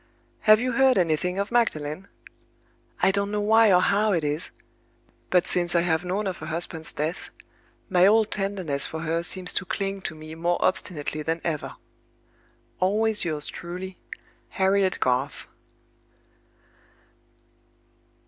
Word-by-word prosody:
"Have 215 0 +8
you 250 +1 -1
heard 260 +1 +3
anything 180 +1 0
of 200 +2 -2
Magdalen? 185 -7 -1 1.0
I - - +5
don't 200 +1 -1
know 210 0 -2
why 220 +1 +4
or 180 -1 +5
how 210 +1 +2
it 165 -3 0
is; 150 +3 -2 0.8
but 180 -1 +3
since 175 -1 +2
I 170 - +4
have 165 -1 0
known 190 +4 -2
of 190 -2 -4
her 155 - -8
husband's 160 -1 -1
death, 155 +4 -4 0.6
my 185 -1 +4
old 220 +1 +3
tenderness 190 -8 +1
for 160 - -6
her 165 +1 -1
seems 180 +1 0
to - - -1
cling 195 +1 -3
to 160 - -4
me 155 0 -10
more 170 +2 0
obstinately 155 -4 -1
than 165 +2 -2
ever. 155 -3 -3 1.0
"Always 210 +3 +2
yours 155 -3 -3
truly, 180 +2 -7 0.5
"HARRIET 190 0 +1
GARTH." 130 +2 -1
180 Hz, 140 wpm, -25 LUFS, 160-200 Hz, 1.0 s, Have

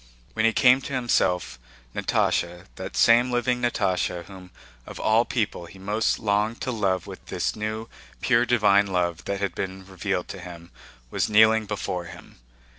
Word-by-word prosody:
When 110 0 +1
he 115 - +5
came 125 +2 +5
to 140 - -7
himself, 95 - 0 0.4
Natásha, 90 +1 0
that 95 0 -7
same 120 +2 +5
living 125 0 0
Natásha 95 -7 0
whom 95 -2 -12 0.4
of - - -9
all 110 +2 +3
people 105 -7 -2
he 95 - -14
most 105 +4 0
longed 105 +1 0
to 130 - -2
love 95 -6 0
with - - -10
this - - -2
new 110 +1 -4 0.3
pure 120 -1 +2
divine 100 -4 +4
love 90 -2 -1
that 100 0 -2
had 100 -3 -2
been 95 0 -5
revealed 95 -1 -3
to 95 - -7
him, 85 -1 -11 0.4
was - - 0
kneeling 110 0 +5
before 90 -4 -3
him. 85 - -13
100 Hz, 165 wpm, -25 LUFS, 95-115 Hz, 0.4 s, he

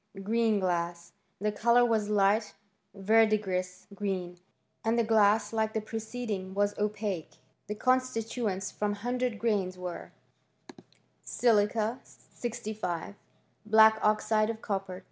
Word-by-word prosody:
Green 225 0 +2
glass. 170 -2 -2 0.3
The 210 +2 0
colour 235 +3 +4
was 220 -3 0
light 210 +1 +2 0.4
verdigris 195 -3 +1
green, 185 -3 -4 0.4
and 225 +1 +1
the 235 - +3
glass, 220 0 +3
like 220 -1 0
the 220 - 0
preceding, 220 -3 -5
was 205 0 +1
opaque* 205 -5 -3 0.3
The 210 - -4
constituents 225 -5 -1
from 210 0 -1
100 245 +2 -2
grains 205 -4 -1
were, 180 -1 -7 1.1
Silica 220 +1 +1
65 215 -7 -6 0.5
Black 220 0 +6
oxide 215 0 +2
of 225 -1 -4
copper 195 -4 -4
210 Hz, 110 wpm, -29 LUFS, 195-225 Hz, 1.1 s, Black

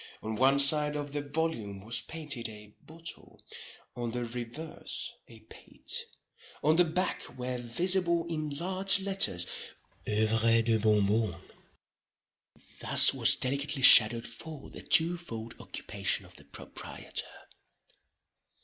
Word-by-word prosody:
On 110 0 -4
one 135 +4 +3
side 150 +1 +5
of 145 -1 -5
the 145 - -2
volume 140 -10 -4
was 115 +1 0
painted 145 -8 -3
a 105 -1 -13
bottle; 165 +1 -12 0.6
on 120 -1 -4
the 120 +1 -4
reverse 120 +7 -7
a 115 -2 -16
paté. 110 - -13 0.7
On 155 +2 +3
the 180 - +5
back 180 +3 -3
were 125 0 -4
visible 170 +7 +1
in 155 -2 -4
large 185 +6 +3
letters 190 - +2 0.6
Œuvres 110 +1 +2
de 115 -1 +1
Bon 105 -1 +2
Bon. 110 +2 -1 1.4
Thus - - +5
was - - +3
delicately 140 +1 -1
shadowed 115 -2 +7
forth 145 +5 -10
the - - -9
two 170 +1 +2
fold 115 -9 -8
occupation - - -4
of - - -18
the - - -14
proprietor. - - -9
135 Hz, 125 wpm, -29 LUFS, 115-160 Hz, 1.4 s, shadowed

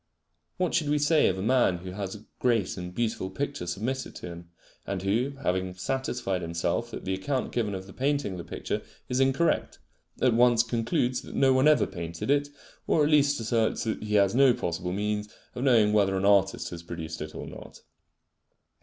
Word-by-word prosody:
What 180 -2 0
should 155 -4 +1
we 150 - +3
say 150 +2 +4
of 95 - 0
a 95 - -3
man 120 -6 +3
who 90 +1 -8
has 95 +1 -5
a 105 - -13
great 115 -7 +1
and 90 -1 -6
beautiful 110 -2 -2
picture 140 -3 -4
submitted 115 +9 -3
to - - -8
him, 85 0 -10 0.4
and 95 -1 -3
who, 115 +8 +1
having 95 0 -1
satisfied 120 -1 -2
himself 85 0 -1
that - - -8
the 95 - -1
account 130 +8 -2
given 105 -5 -1
of 95 0 -6
the 95 - -12
painting 140 -4 0
of 95 - -6
the - - -5
picture - - -4 0.3
is 125 - 0
incorrect, 135 +5 +1 0.4
at 125 -2 +3
once 120 0 +5
concludes 120 +1 0
that - - -10
no 135 -1 +4
one 130 +3 +4
ever 155 - +5
painted 85 +7 -4
it, 145 0 +2 0.4
or 155 - +3
at 150 - +2
least 145 -2 +4
asserts 115 0 0
that 110 - -2
he 105 0 -2
has 100 -1 +4
no 130 -1 +5
possible 90 +1 -3
means 105 +2 -2 0.2
of 125 - -4
knowing 115 -6 +4
whether 100 -2 +3
an 95 - 0
artist 100 -1 +3
has 85 -1 -7
produced 80 -2 -6
it 75 0 -6
or - - -6
not? - - -11
110 Hz, 200 wpm, -27 LUFS, 95-130 Hz, 0.4 s, once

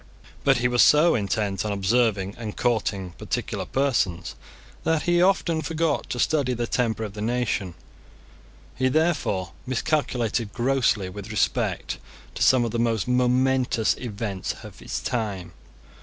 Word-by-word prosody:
But 135 -2 +4
he 120 0 +2
was 120 0 +3
so 155 +3 +6
intent 100 -1 -1
on 105 - -2
observing 100 -1 +1
and 110 -3 -7
courting 100 -6 0
particular - - -3
persons, 100 -11 0 0.5
that 160 -1 +1
he 175 0 +3
often 180 -3 +2
forgot 160 -2 -1
to - - -3
study 140 -4 +2
the 120 0 -1
temper 115 -2 0
of 105 -3 -5
the 105 - -7
nation. 110 -6 -1 1.0
He 130 - +1
therefore 130 - 0 0.2
miscalculated 125 -4 -1
grossly 120 -5 +1
with 100 +3 -8
respect 105 - -1 0.3
to - - -7
some 130 -2 +5
of 115 - -3
the 115 - -2
most 115 -3 +1
momentous 125 -1 +2
events 105 -5 -4
of - - -11
his - - -4
time. 100 -7 -3
120 Hz, 140 wpm, -25 LUFS, 105-130 Hz, 1.0 s, so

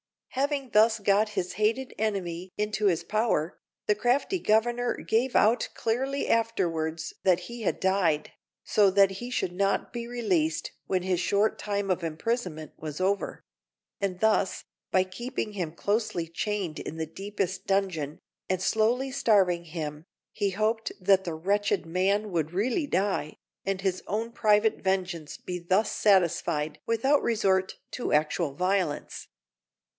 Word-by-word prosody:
Having 275 0 -1
thus 220 +2 +5
got 205 +1 +2
his 190 -4 -3
hated 225 +6 0
enemy 185 -4 -2
into 210 0 -1
his 170 -3 +1
power, 210 -5 0 0.3
the 210 - +4
crafty 250 - +1
Governor 240 +2 +2
gave 245 +3 0
out 225 +3 +4
clearly 265 +5 -1
afterwards 165 -8 0
that 180 -1 +4
he 235 +6 -8
had 215 - -1
died, 185 -6 +1 0.3
so 205 -2 +4
that 195 0 +5
he 240 +6 -6
should 240 -7 -1
not 195 +2 0
be 235 -1 -4
released 185 -10 0 0.2
when 185 -2 0
his 185 -2 0
short 200 +4 +1
time 200 -2 -1
of 185 -1 -1
imprisonment 165 -1 -3
was 155 0 -6
over; 195 +2 -1 0.6
and 195 -3 -2
thus, 220 -3 +2 0.3
by 185 - +3
keeping 225 +4 -4
him 175 -6 -3
closely 200 -3 -1
chained 185 -1 -3
in - - -6
the 160 - -2
deepest 195 +3 -4
dungeon, 185 -7 0 0.3
and 185 -1 0
slowly 235 +6 +1
starving 190 -9 +3
him, 155 -2 -5 0.3
he 200 -1 -1
hoped 220 +3 0
that 190 0 +3
the 170 -2 -3
wretched 200 +5 0
man 195 +5 +1
would 160 -2 -1
really 245 - 0
die, 190 - 0 0.3
and 195 -1 -1
his 190 -1 -1
own 225 +3 -2
private 215 -1 +3
vengeance 185 -5 -1
be 180 -1 -5
thus 190 +5 +1
satisfied 170 -6 +2
without 265 +6 +3
resort 190 -4 +1 0.2
to 250 - -3
actual 155 0 +1
violence. 180 -3 -1
195 Hz, 145 wpm, -28 LUFS, 175-220 Hz, 0.6 s, thus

